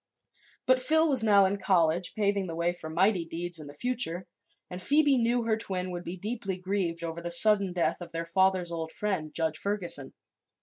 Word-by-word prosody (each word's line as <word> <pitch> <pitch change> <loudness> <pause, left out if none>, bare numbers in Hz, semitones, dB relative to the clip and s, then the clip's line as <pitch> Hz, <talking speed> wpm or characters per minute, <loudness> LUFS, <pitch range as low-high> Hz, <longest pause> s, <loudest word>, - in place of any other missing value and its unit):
But 255 0 +3
Phil 315 +4 +3
was 270 -5 +3
now 205 -3 +5
in 195 +2 0
college, 175 -3 +1
paving 200 -2 0
the 165 - -5
way 170 +1 0
for 160 -2 -9
mighty 185 +3 +2
deeds 170 +1 -2
in 150 - -9
the 145 - -11
future, 185 -4 0 0.4
and 180 +1 -8
Phoebe 290 +5 +3
knew 240 0 +1
her 225 -1 +1
twin 185 -4 -4
would 175 0 -5
be 180 +2 -6
deeply 205 -1 -4
grieved 180 -3 -2
over 165 0 -5
the 175 - -4
sudden 200 +2 +4
death 175 0 -1
of 170 -1 -8
their 165 0 -4
father's 185 0 +1
old 165 -1 -4
friend, 190 -7 -3
Judge 160 -2 -2
Ferguson. 180 -9 -2
185 Hz, 200 wpm, -28 LUFS, 170-210 Hz, 0.4 s, now